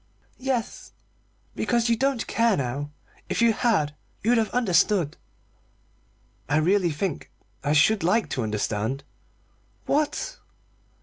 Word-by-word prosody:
"Yes 255 -3 -3 0.6
because 235 -1 +1
you 235 - +3
don't 265 0 0
care 230 -3 +2
now. 140 +3 -3 0.4
If - - -1
you 230 -1 +5
had, 205 -11 +1 0.3
you'd 235 +2 +4
have 220 -2 0
understood." 185 - +2 1.3
"I 145 - +3
really 180 +3 +3
think 155 +1 -3 0.3
I 145 +1 +1
should 195 +7 +4
like 210 +7 +2
to 130 - -1
understand." 110 +4 -2 0.8
"What?" 310 - -1
200 Hz, 115 wpm, -25 LUFS, 145-235 Hz, 1.3 s, you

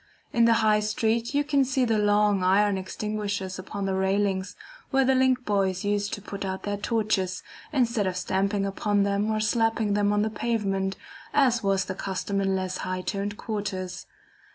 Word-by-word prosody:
In 235 0 +4
the 230 - +5
High 210 0 +4
Street 225 +4 0
you 290 - +3
can 285 -2 +2
see 260 0 +1
the 225 -2 +1
long 205 -1 +3
iron 200 +2 +3
extinguishers 200 0 -3
upon 200 +1 -5
the 195 - 0
railings 190 0 0 0.3
where 270 -1 +3
the 265 - +4
link 255 -1 +2
boys 195 -3 0
used 205 0 0
to 205 - -5
put 200 -1 -6
out 190 0 -4
their 205 0 -2
torches, 205 -4 -1 0.3
instead 235 -7 +1
of 180 -1 -2
stamping 195 +2 0
upon 200 +1 +1
them 200 +1 0
or 215 0 0
slapping 225 -1 +1
them 205 0 +2
on 205 0 +2
the 220 - -1
pavement, 200 -4 -1 0.4
as 255 -5 +4
was 195 -2 +1
the - - -4
custom 195 +1 -2
in 195 0 +1
less 185 -1 -2
high 185 0 -3
toned 200 +2 -3
quarters. 190 -4 -4
205 Hz, 180 wpm, -26 LUFS, 195-220 Hz, 0.4 s, the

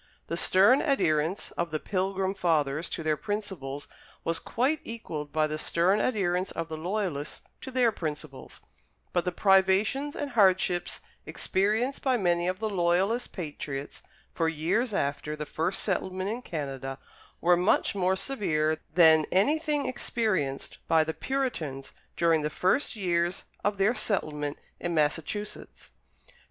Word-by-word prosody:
The 170 - -1
stern 200 +10 +5
adherence 170 - +1
of 170 0 -2
the 155 0 -2
Pilgrim 190 +1 -1
Fathers 160 -4 0
to 165 - -4
their 155 -1 +2
principles 190 -9 -4 0.4
was 165 0 +1
quite 275 +6 0
equalled 155 -11 -6
by 155 -1 +2
the 155 0 -3
stern 180 +6 +2
adherence 185 -5 0
of 165 0 -4
the 160 - -4
Loyalists 170 -3 -3 0.2
to - - -7
their 250 -3 +3
principles; 150 -6 -6 0.5
but 175 -1 +1
the 180 - 0
privations 195 +10 +3
and 285 -1 -4
hardships 185 -5 +2 0.3
experienced 215 +8 0
by 260 -2 +2
many 175 -4 +1
of 185 0 -1
the 220 - -2
Loyalist 190 +5 +1
patriots 145 -5 -6 0.3
for 165 -1 +1
years 170 +10 0
after 145 -3 -1
the 150 0 -5
first 165 +6 -1
settlement 190 0 -1
in 235 +3 -4
Canada 135 - -5 0.4
were 175 +1 +5
much 180 +5 +2
more 190 -1 +1
severe 160 -10 0 0.2
than 160 -3 +6
anything 295 - +2
experienced 210 - -1
by 160 -1 +4
the 160 +1 -3
Puritans 160 - -3 0.2
during 165 -2 +3
the 150 - -1
first 185 - +1
years 175 -3 0 0.2
of 205 0 0
their 195 +4 +3
settlement 150 -11 -2 0.2
in 175 -1 -2
Massachusetts. 165 +7 -2
180 Hz, 140 wpm, -28 LUFS, 155-210 Hz, 0.5 s, than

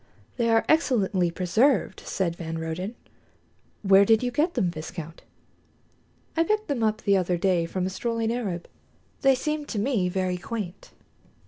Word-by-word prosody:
"They 235 -2 +1
are 225 0 +3
excellently 205 - +2
preserved," 195 +9 +1
said 175 -3 -2
van 165 -1 -5
Roden. 165 +7 -4 0.9
"Where 195 0 +7
did 220 +3 +4
you 245 - 0
get 305 +8 0
them, 190 -9 +1
viscount?" 165 0 -8 1.1
"I 330 - +3
picked 425 +4 0
them 275 -5 -1
up 215 -1 0
the 200 - +3
other 180 -1 0
day 175 -2 +1
from 185 +1 -2
a - - -1
strolling 230 +2 -1
Arab. 195 -8 -3 0.5
They 270 -1 +5
seemed 300 +2 -3
to 225 - -4
me 205 -4 +1
very 185 0 -1
quaint." 200 -1 -6
200 Hz, 155 wpm, -26 LUFS, 180-245 Hz, 1.1 s, Where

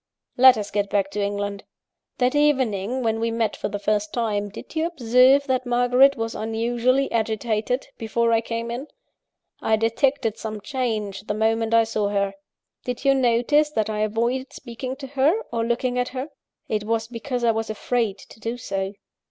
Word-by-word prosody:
"Let 255 -1 +7
us 205 -1 -4
get 205 -1 0
back 195 -1 0
to 210 - -2
England. 200 0 -2 0.5
"That 250 0 +2
evening, 260 -6 +1
when 225 -1 0
we 230 0 0
met 230 -1 -1
for - - -3
the 205 - -3
first 210 0 0
time, 210 -4 -1
did 205 - -11
you 320 +1 +1
observe 260 -2 +4
that 255 -2 -1
Margaret 250 +3 +4
was 225 0 -3
unusually 240 +4 0
agitated 220 +2 -1
before 230 +1 +1
I 225 - +3
came 230 0 -4
in? 255 +5 -5 0.7
I 220 - +3
detected 225 +1 0
some 215 -1 -5
change, 215 -5 -3
the 210 - -1
moment 225 +1 +1
I 230 - +6
saw 215 -2 -1
her. 200 -1 0 0.5
Did 250 +1 -5
you 275 - +6
notice 265 +4 +3
that 220 -3 0
I 210 - -3
avoided 235 +5 -1
speaking 255 +1 -6
to 275 0 -8
her, 280 - +2
or 230 - 0
looking 245 +2 0
at 250 - 0
her? 260 +3 -5 0.4
it 215 -1 -1
was 225 +1 -1
because 245 +1 -4
I 235 - +4
was 225 0 -3
afraid 215 -1 -1
to 220 - -15
do 230 +3 -4
so. 195 -4 -3
230 Hz, 180 wpm, -23 LUFS, 215-255 Hz, 0.7 s, Let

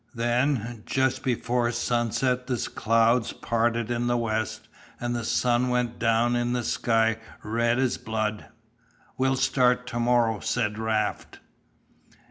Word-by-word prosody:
Then, 120 -1 0
just 130 -1 +1
before 120 -2 0
sunset 120 +2 0
the 125 - -1 0.2
clouds 115 +1 +2
parted 115 0 -1
in 120 0 -1
the 120 0 +2
west 110 -1 -2 0.3
and 120 0 -2
the 120 - -3
sun 120 +2 +1
went 125 -1 -1
down 120 +1 +2
in 120 0 0
a 120 - -1
sky 115 -1 +1 0.3
red 115 +2 +1
as 130 -2 0
blood. 110 -1 -3 0.7
"We'll 130 0 +2
start 125 -1 +2
tomorrow," 120 -2 +1
said 110 -1 -1
Raft. 110 -1 -2
120 Hz, 125 wpm, -26 LUFS, 115-125 Hz, 0.7 s, clouds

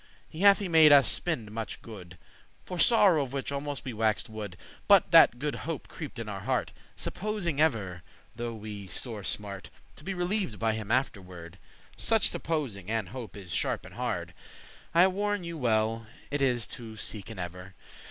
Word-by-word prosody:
He 155 - -11
hath 200 +1 +7
y 200 - -3
made 160 -3 +7
us 140 -2 +7
spende 125 -12 +1
muche 110 -1 -5
good, 90 -6 -11 0.5
For 180 -1 -6
sorrow 195 -7 +7
of 135 -2 -4
which 140 0 -3
almost 140 0 -4
we 130 - -4
waxed 110 0 0
wood,* 105 -4 -6
*mad - - -18 0.3
But - - +5
that 120 - +7
good 145 +2 -2 0.2
hope 165 - -4
creeped 155 -6 -8
in 115 -1 -5
our 100 -2 -5
heart, 95 - -1 0.2
Supposing 185 -8 -2
ever, 100 - 0 0.3
though 120 0 -4
we 105 -2 -8
sore 105 +3 -3
smart, 100 -1 -4 0.3
To - - -13
be 195 +3 -4
relieved 180 - -1
by 115 -1 +1
him 110 -2 -5
afterward. 95 -9 -3 0.4
Such 225 -3 +3
supposing 120 - -3
and 110 -4 -1
hope 120 -2 -8
is 95 -3 -10
sharp - - -1
and - - -12
hard. - - -3 0.6
I 170 +2 +6
warn 205 +1 -1
you 170 0 -5
well 115 -4 0 0.2
it 145 0 -1
is 125 -4 +2
to 115 -2 -8
seeken 110 0 -6
ever. 90 +1 -7
120 Hz, 180 wpm, -29 LUFS, 105-160 Hz, 0.6 s, hath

